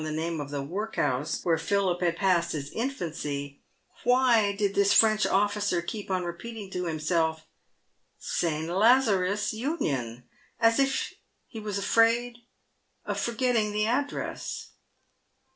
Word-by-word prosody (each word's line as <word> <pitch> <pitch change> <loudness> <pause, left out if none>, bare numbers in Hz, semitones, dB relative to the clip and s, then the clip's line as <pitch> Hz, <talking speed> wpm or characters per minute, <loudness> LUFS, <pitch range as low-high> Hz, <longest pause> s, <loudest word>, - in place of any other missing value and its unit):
the 155 - -3
name 160 +1 -2
of 145 - -6
the 145 -1 -3
workhouse 160 - -2
where 165 -2 +2
Philip 185 +1 0
had 170 -2 +1
passed 175 -3 +2
his 145 -2 -5
infancy, 155 - -4 0.4
!why 245 -4 +4
did 200 0 -1
this 200 0 +3
French 215 -1 +5
officer 205 -2 +1
keep 205 +4 -6
on 185 -1 0
repeating 195 +4 -7
to 180 -1 -3
himself, 160 0 -1 0.4
" - - -46 0.2
St. 160 -2 -1
Lazarua 200 0 +3 0.2
Union," 140 - -2 0.4
as 230 +2 +4
if 270 -1 0 0.3
he 225 - -9
was 210 -2 -4
afraid 230 +4 +2 0.7
of - - -2
forgetting 235 -3 0
the 210 0 +1
address 280 +5 -3
195 Hz, 130 wpm, -27 LUFS, 165-225 Hz, 0.7 s, French